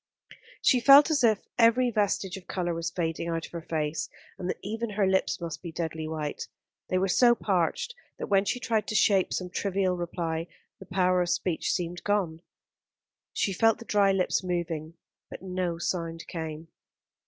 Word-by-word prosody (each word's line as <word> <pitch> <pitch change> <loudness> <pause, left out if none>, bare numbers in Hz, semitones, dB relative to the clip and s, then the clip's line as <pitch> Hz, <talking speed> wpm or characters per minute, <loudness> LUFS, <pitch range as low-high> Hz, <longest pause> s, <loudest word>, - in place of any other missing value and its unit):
She 255 - +5
felt 275 +6 +8
as 285 -4 +2
if 220 -3 +3
every 240 +2 +5
vestige 205 -3 0
of 190 -2 -11
colour 175 -2 -2
was 165 0 -2
fading 165 -1 -2
out 165 -1 -2
of - - -14
her 170 - -5
face, 155 -1 -2 0.3
and 180 -1 -3
that - - -2
even 225 +3 -3
her 205 -1 +1
lips 190 0 +1
must 170 -2 -5
be 170 - -7
deadly 160 -1 -4
white. 155 -2 -4 0.4
They 185 - +1
were 190 +1 +1
so 240 +5 +5
parched 190 - 0 0.2
that - - -4
when 195 0 +2
she 250 +5 -1
tried 220 -4 0
to 215 - -3
shape 195 -2 +3
some 180 -1 -3
trivial 190 -1 0
reply 170 -1 -3 0.3
the 190 - -12
power 185 -1 +2
of 175 - -1
speech 175 -2 0
seemed 175 -1 -3
gone. 185 -6 0 0.9
She 195 - 0
felt 225 +4 +3
the 230 - -11
dry 200 -2 +3
lips 190 0 +1
moving; 170 -3 -3 0.3
but - - -9
no 180 -2 -2
sound 165 -1 -3
came. 160 -1 -6
180 Hz, 180 wpm, -28 LUFS, 165-205 Hz, 0.9 s, felt